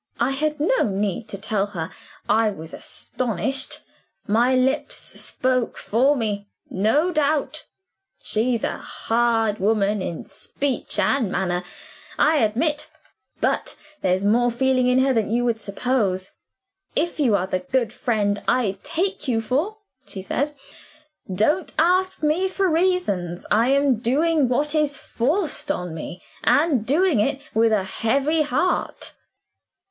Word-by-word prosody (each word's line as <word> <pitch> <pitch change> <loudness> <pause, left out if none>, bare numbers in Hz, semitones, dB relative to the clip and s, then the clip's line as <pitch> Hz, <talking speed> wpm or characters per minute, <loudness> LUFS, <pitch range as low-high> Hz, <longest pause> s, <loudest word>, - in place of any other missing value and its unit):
"I 240 +3 +2
had 300 +2 -1
no 425 +12 +2
need 200 +2 -2
to 200 - -5
tell 200 0 -1
her 170 -6 -5 0.4
I 220 +1 +3
was 160 -5 -8
astonished; 255 +3 -1 0.4
my 240 +5 +3
lips 265 +3 +1
spoke 255 -2 -1
for 260 +7 +2
me, 205 -5 -2 0.2
no 255 - +2
doubt. 305 -1 0 0.5
She's 230 +1 0
a - - -1
hard 225 -2 0
woman 205 0 +1
in 170 -3 -4
speech 275 -3 -2
and 245 -8 +2
manner, 180 -2 -1 0.5
I 310 0 +4
admit. 295 +7 +1 0.5
But - - 0 0.3
there's 185 +1 +1
more 240 +4 +3
feeling 255 +1 +2
in 250 0 +3
her 270 - +3
than 225 -4 0
you 240 +2 +1
would 230 -2 0
suppose. 200 -3 -1 0.6
'If 330 +2 0
you 245 -8 +3
are 185 -2 +1
the 185 -1 -1
good 225 +4 -1
friend 205 -3 0
I 225 -6 +1
take 360 -1 -2
you 235 -3 +1
for,' 290 - -1 0.3
she 190 - -6
says, 285 +9 -1 0.8
'don't 295 - +1
ask 365 +1 +2
me 315 +5 +2
for 380 0 0
reasons; 320 - 0
I 225 +3 +4
am 275 -2 +3
doing 285 +3 +2
what 290 +4 +1
is 300 -2 +1
forced 295 - -1
on 180 - -2
me, 165 +2 -7 0.2
and 290 -7 +3
doing 315 - +3
it 270 +6 +1
with 225 +1 +3
a 210 -3 +2
heavy 275 +11 +1
heart. 305 +5 -1
245 Hz, 140 wpm, -23 LUFS, 210-295 Hz, 0.8 s, I